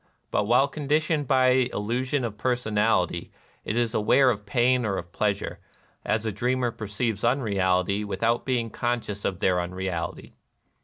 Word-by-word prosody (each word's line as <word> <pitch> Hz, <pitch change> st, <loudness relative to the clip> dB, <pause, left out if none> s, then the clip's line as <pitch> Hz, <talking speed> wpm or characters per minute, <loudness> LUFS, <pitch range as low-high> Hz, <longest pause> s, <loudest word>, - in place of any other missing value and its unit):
But 105 Hz, -, +1 dB
while 125 Hz, +5 st, +4 dB
conditioned 150 Hz, +1 st, 0 dB
by 130 Hz, -1 st, +4 dB
the 130 Hz, -1 st, +2 dB
illusion 125 Hz, +6 st, -1 dB
of 110 Hz, -3 st, -4 dB
personality, 105 Hz, -7 st, 0 dB, 0.3 s
it 110 Hz, -, -2 dB
is 120 Hz, -2 st, +1 dB
aware 125 Hz, +5 st, +4 dB
of 105 Hz, -3 st, -6 dB
pain 125 Hz, +3 st, +2 dB
or 100 Hz, -3 st, -1 dB
pleasure, 100 Hz, +4 st, -2 dB, 0.4 s
as 110 Hz, 0 st, 0 dB
a 110 Hz, -, 0 dB
dreamer 125 Hz, +4 st, 0 dB
perceives 105 Hz, 0 st, -3 dB
unrealities 100 Hz, -5 st, +1 dB
without 115 Hz, +4 st, 0 dB
being 120 Hz, -4 st, -1 dB
conscious 120 Hz, -4 st, -2 dB
of 95 Hz, -, -1 dB
their 90 Hz, 0 st, +2 dB
unreality. 90 Hz, -2 st, -4 dB
115 Hz, 145 wpm, -26 LUFS, 100-125 Hz, 0.4 s, while